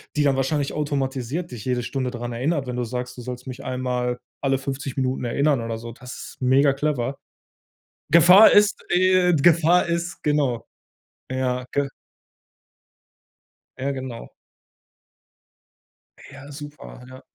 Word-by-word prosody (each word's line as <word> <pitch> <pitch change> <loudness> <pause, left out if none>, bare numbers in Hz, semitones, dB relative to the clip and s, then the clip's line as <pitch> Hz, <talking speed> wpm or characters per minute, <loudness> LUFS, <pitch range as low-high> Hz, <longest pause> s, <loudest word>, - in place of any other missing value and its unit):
die 150 - +2
dann 135 -2 +2
wahrscheinlich 140 +1 0
automatisiert 140 +2 -3
dich 115 -2 -8
jede 125 -1 0
Stunde 130 0 -3
dran 120 0 -5
erinnert, 135 +3 -1
wenn 125 - -4
du 125 - -1
sagst: 125 +1 -5
„Du - - -7
sollst 125 +1 -7
mich 130 -2 -8
einmal 125 -1 -2 0.2
alle 135 -1 +1
50 135 0 -5
Minuten 130 -1 -1
erinnern“ 140 +2 +1
oder 115 -1 -4
so? 115 +1 -8
Das 125 +2 -10 0.2
ist - - -46
megaclever. 135 0 +2 0.9
Gefahr 180 +6 +8
ist 205 0 +4
äh, 185 0 +4
Gefahr 170 +3 +4
ist, 170 0 -3
genau. 140 -6 0 0.6
Ja, 125 -1 -1
g 140 0 0 1.9
Ja, 135 +1 -2
genau. 130 -3 -7 2.0
Ja, 140 +1 -12
super, 145 -3 -10
ja. 130 +1 -12
135 Hz, 130 wpm, -23 LUFS, 125-150 Hz, 2.0 s, Gefahr